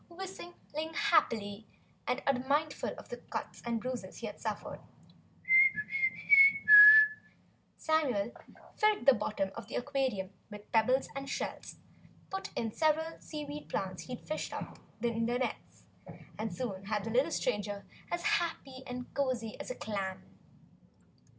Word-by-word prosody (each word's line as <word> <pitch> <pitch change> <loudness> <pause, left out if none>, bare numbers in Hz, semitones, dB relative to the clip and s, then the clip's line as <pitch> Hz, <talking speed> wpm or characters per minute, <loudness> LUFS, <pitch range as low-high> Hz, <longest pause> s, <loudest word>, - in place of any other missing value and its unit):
Whistling 345 -3 -8
happily 220 - 0 0.4
and 255 +2 -2
unmindful 280 +3 -1
of - - -13
the - - -6
cuts - - -7
and 235 -1 -2
bruises 255 +2 -6
he - - -7
had - - -8
suffered, - - -5 3.0
Samuel 260 -10 0 0.4
filled 425 -1 +1
the 275 - +7
bottom 210 -3 -3
of - - -9
the - - -7
aquarium 250 -8 -2 0.2
with 210 0 -12
pebbles 255 +4 +2
and 275 0 -6
shells, - - -5 0.6
put 385 0 -5
in 225 -1 -2
several 320 +4 0
seaweed 295 -1 -8
plants 185 -2 -4
he'd 250 -2 -9
fished 310 - -4
up - - -7 0.2
in 230 -1 -1
the 240 +1 0
nets, 255 - -5 0.6
and 220 0 -3
soon 195 -7 -6
had 210 0 -2
the 225 - -5
little 255 +7 +2
stranger 205 -8 -3 0.2
as 345 - -3
happy 335 -10 -2
and 250 0 -7
cozy 255 -5 -2
as - - -7
a 255 - -5
clam. 195 -3 -5
255 Hz, 130 wpm, -31 LUFS, 215-305 Hz, 3.0 s, the